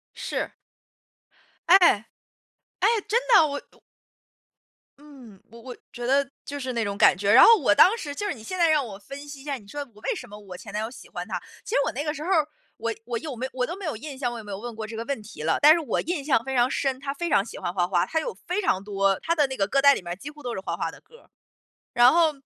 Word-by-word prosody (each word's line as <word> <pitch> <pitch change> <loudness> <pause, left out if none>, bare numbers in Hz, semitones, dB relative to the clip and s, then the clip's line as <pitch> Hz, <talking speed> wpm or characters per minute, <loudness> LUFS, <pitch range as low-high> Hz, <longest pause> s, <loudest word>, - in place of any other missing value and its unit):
是。 - - -4 1.2
哎， 375 - +9 1.0
哎， - - +4 0.2
真 470 +4 +3
的， 330 -7 +7
我 285 - -4 0.2
我 - - -24 1.2
嗯， 260 -9 -15
我 230 - -13
我 250 0 -9 0.2
觉 240 0 -6
得 275 +2 +2 0.2
就 285 0 -6
是 255 -1 -4
那 230 -1 0
种 200 0 -3
感 180 - +5
觉。 200 +1 +1
然 240 - +9
后 460 -1 +8
我 225 - +3
当 405 - +6
时 290 -8 -5
就 410 +8 -3
是 - - -1
你 220 -4 -13
现 370 +9 -5
在 335 -1 +4
让 300 -4 +3
我 200 -3 -8
分 275 +7 -10
析 285 -2 -9
一 - - -14
下， 285 -2 -3
你 205 -5 -12
说 290 +5 -6
我 210 - -17
为 - - -1
什 245 - -8
么 210 - -10
我 190 -3 -10
前 - - -10
男 210 +1 -2
友 225 - -5
喜 - - -13
欢 - - -6
他， - - -3 0.3
其 - - -10
实 - - +4
我 - - -1
那 290 - -3
个 300 -1 -2
时 305 0 -7
候 360 - -4
儿， 315 -5 +3 0.3
我 230 0 -2
我 240 -1 -3
有 295 -3 -6
没 255 +3 -3
我 250 -1 0
都 345 - -5
没 390 -2 -8
有 290 -8 -3
印 280 +2 -8
象， 245 -3 -2
我 240 - -6
有 220 - -8
没 205 - -9
有 195 - -5
问 240 0 -7
过 220 -1 -5
这 220 +1 -8
个 225 - -4
问 280 -6 -3
题 210 - -11
了。 160 +1 +1
但 300 +2 +9
是 340 - +1
我 310 - -2
印 330 -3 -3
象 265 -6 +2
非 265 0 -4
常 245 +1 +3
深， 265 -1 -1
他 275 0 -4
非 340 +4 -4
常 195 - +3
喜 225 - -10
欢 175 - -4
花 175 -2 +1
花， 180 -1 +1
他 320 - -1
有 475 - -5
非 380 +4 0
常 195 - 0
多 195 -1 +1
他 335 - +1
的 295 -3 +3
那 265 - -6
个 195 - +1
歌 275 +5 +2
单 280 0 +7
里 - - -5
面 175 0 -5
几 280 +8 -8
乎 295 0 -14
都 245 -1 -3
是 190 - -4
花 - - -3
花 - - -2
的 - - -15
歌。 475 - -21 0.6
然 245 +3 +6
后， 330 -2 +4
265 Hz, 305 characters per minute, -25 LUFS, 215-300 Hz, 1.2 s, 哎